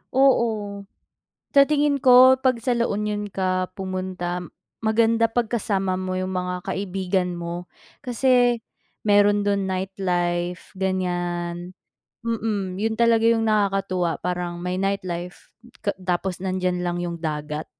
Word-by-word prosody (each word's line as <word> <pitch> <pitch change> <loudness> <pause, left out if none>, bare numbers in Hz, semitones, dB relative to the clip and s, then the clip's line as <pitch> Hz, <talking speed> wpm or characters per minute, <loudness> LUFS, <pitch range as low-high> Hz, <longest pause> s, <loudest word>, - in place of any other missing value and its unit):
oo. 220 -7 +2 0.7
Sa 280 - +9
tingin 290 -1 +2
ko 255 0 +8
'pag 255 -3 +2
sa 245 +1 0
La 235 0 +1
Union 210 0 -2
ka 185 -1 -1
pumunta 185 -2 -3 0.4
maganda 225 +1 +3
'pag 240 -1 0
kasama 195 -5 0
mo 185 0 -3
'yung 185 0 -3
mga 180 0 -2
kaibigan 185 -2 -1
mo, 170 +1 -6 0.3
kasi 245 -1 +3 0.5
meron 205 0 +4
do'n 200 -1 +1
nightlife 180 -2 -2
ganiyan, 175 -2 -2 0.5
mm, 210 -5 -2
'yun 220 +2 0
talaga 230 0 +3
'yung 230 -1 +4
nakakatuwa 195 -5 +1
parang 180 -1 -3
may 180 +1 -2
nightlife 185 -3 -3 0.3
ka 205 - +1
tapos 180 0 -2
nandiyan 185 -1 -1
lang 175 0 -1
'yung 170 -1 -4
dagat, 150 -1 -4
190 Hz, 125 wpm, -23 LUFS, 180-225 Hz, 0.7 s, Sa